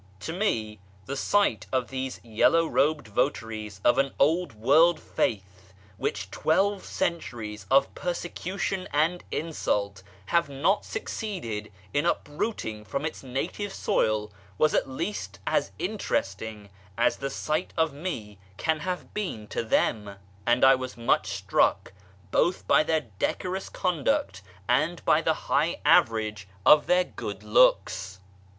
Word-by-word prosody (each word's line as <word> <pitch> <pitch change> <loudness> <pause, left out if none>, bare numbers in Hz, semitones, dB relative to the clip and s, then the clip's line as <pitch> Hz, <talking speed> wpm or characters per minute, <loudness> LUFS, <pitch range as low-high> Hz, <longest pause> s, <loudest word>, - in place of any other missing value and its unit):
To 160 - -4
me 115 - -1 0.3
the 140 - -4
sight 170 - +1
of 130 -2 0
these 130 -1 -4
yellow 120 +9 +3
robed 150 -4 +1
votaries 110 -3 -2
of 120 - +5
an 135 0 +1
old 165 +1 +2
world 155 +9 +4
faith, 95 -2 -3 0.2
which - - -3
twelve 195 +5 +1
centuries 110 - -3
of 135 +1 +4
Ijersecution 185 +2 -3
and 160 +5 +1
insult 105 - -2 0.2
have 170 - +1
not 150 +9 +1
succeeded 135 - -4 0.2
in 145 - +2
uprooting 145 - -2
from 135 +9 -3
its 155 - -4
native 150 +10 -3
soil, 105 - 0 0.3
was 155 - +3
at - - +1
least 170 +10 -4
as - - +1
interesting 105 +1 -3 0.3
as - - +2
the 140 - -3
sight 155 +5 -2
of 160 -2 +2
me 115 - -5 0.2
can 160 -1 0
have 180 +2 -4
been 180 - -3
to - - -2
them, 105 -2 0 0.3
and 120 +2 +5
I 135 - +8
was 130 -1 -4
much 115 0 +2
struck - - +1 0.4
both 180 - +1
by - - +6
their 160 0 +1 0.2
decorous 185 +1 -2
conduct 140 - 0 0.3
and 155 +7 +1
by - - +4
the - - +2
high - - +1
average 110 -3 +3 0.2
of 150 0 +7
their 180 +1 +4
good 105 - -7
looks. 100 -3 +3
135 Hz, 135 wpm, -27 LUFS, 105-170 Hz, 0.4 s, I